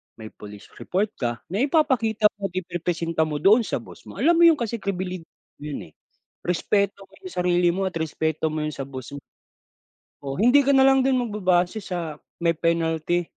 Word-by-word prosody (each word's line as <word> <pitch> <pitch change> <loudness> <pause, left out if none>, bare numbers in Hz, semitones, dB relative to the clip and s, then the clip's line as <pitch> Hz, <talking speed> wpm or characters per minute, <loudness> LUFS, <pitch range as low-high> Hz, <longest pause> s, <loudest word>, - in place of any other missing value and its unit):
may 110 -1 -10
police 105 -1 -12
report 200 +3 -1
ka 120 -2 -3
na 200 - -1
ipapakita 250 -8 +2
mo't 195 -2 -4
iprepresenta 170 -2 -1
mo 150 - -4
doon 210 - +4
sa - - -3
boss - - -15
mo. - - -10
Alam 340 - +3
mo - - +6
yung 325 - +6
kasi 235 -3 -3
crebilid 185 -3 -4 0.3
'yon 145 - -7
eh. - - -42 0.5
Respeto 200 +3 0
mo - - -21
yung 370 -2 -10
sarili 175 0 +2
mo 195 - -1
at 185 -3 -2
respeto 160 0 -1
mo 155 0 -2
'yon 155 - -2
sa 135 -1 -6
boss 130 -1 -8
mo. 140 - -7 1.0
Oh, 135 0 -4
hindi 245 +8 +5
ka 280 - +5
na 265 - +6
lang 270 0 +5
din 265 0 +2
magbabase 205 -4 +1
sa, 170 -6 -5 0.2
may 170 - +4
penalty. 165 +1 0
180 Hz, 190 wpm, -24 LUFS, 160-215 Hz, 1.0 s, mo